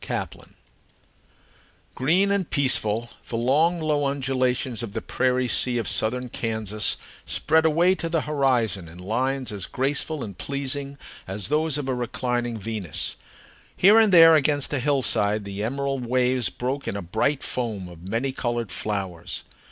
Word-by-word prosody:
HOLLYHOCKS - - -5 1.4
Green 180 +9 +2
and 200 -4 0
peaceful, 120 -5 +2 0.2
the 115 - -2
long, 155 +9 +2
low 150 -2 0
undulations 130 -3 -1
of 110 -4 -6
the 115 - -3
prairie 130 0 0
sea 120 +2 +3
of 115 - -2
southern 125 +3 0
Kansas 110 -3 -2 0.3
spread 160 0 +1
away 170 +4 +4
to 170 -2 -4
the 165 -2 +1
horizon 125 - 0
in 80 +2 -12
lines 125 +7 -1
as 100 -2 -4
graceful 140 +2 -1
and 100 -4 -9
pleasing 140 0 -2 0.3
as 95 +3 -3
those 155 0 +2
of 145 -2 -4
a 130 - 0
reclining 120 -1 -2
Venus. 105 -5 -3 0.6
Here 205 +4 +7
and 220 -3 +4
there 165 -2 +9
against 145 -1 +2
a 145 - +1
hillside 110 -6 +1
the 100 +1 -5
emerald 135 +1 -2
waves 125 -1 +2
broke 130 +3 -4
in - - -2
a 100 - -5
bright 110 - 0
foam 110 -7 -3
of 85 0 -12
many 120 +6 -1
colored 120 -5 -3
flowers. 95 -5 -4
125 Hz, 150 wpm, -24 LUFS, 110-145 Hz, 1.4 s, there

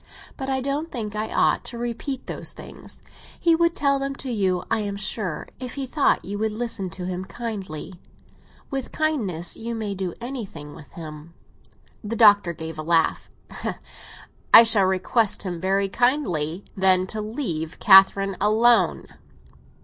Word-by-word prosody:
But 270 -1 -5
I 265 -1 0
don't 285 +5 -3
think 215 -4 -5
I 215 +1 -3
ought - - +2
to 240 - -5
repeat 240 +3 -4
those - - -2
things. - - -10 0.4
He 335 - +4
would 335 0 +2
tell 280 -1 +2
them 275 0 -3
to 265 -2 -6
you, 190 -5 0
I 225 - +2
am 205 -1 -3
sure, 200 -4 -3
if 255 -1 -6
he 275 -1 -3
thought 280 +3 +1
you 205 +2 -5
would 220 0 -1
listen 225 -4 -3
to 180 +1 -7
him 180 0 -4
kindly. 195 -7 -6 0.8
With 270 -2 -4
kindness 215 - -1
you 230 +1 -5
may 215 -3 -3
do 185 -3 -4
anything 215 - -7
with 150 - -13
him." 155 0 -10 0.7
The 215 +2 -3
Doctor 205 -5 +6
gave 160 -1 -7
a - - -1
laugh. 165 0 +1 1.2
"I 230 - +11
shall 220 -4 +4
request 190 +4 +1
him 175 -4 -5
very 195 +1 +1
kindly, 195 - 0
then, 185 -1 +4
to 215 +3 -5
leave 210 - -4
Catherine 195 -1 +6
alone." 225 +3 +3
210 Hz, 155 wpm, -23 LUFS, 185-240 Hz, 1.2 s, I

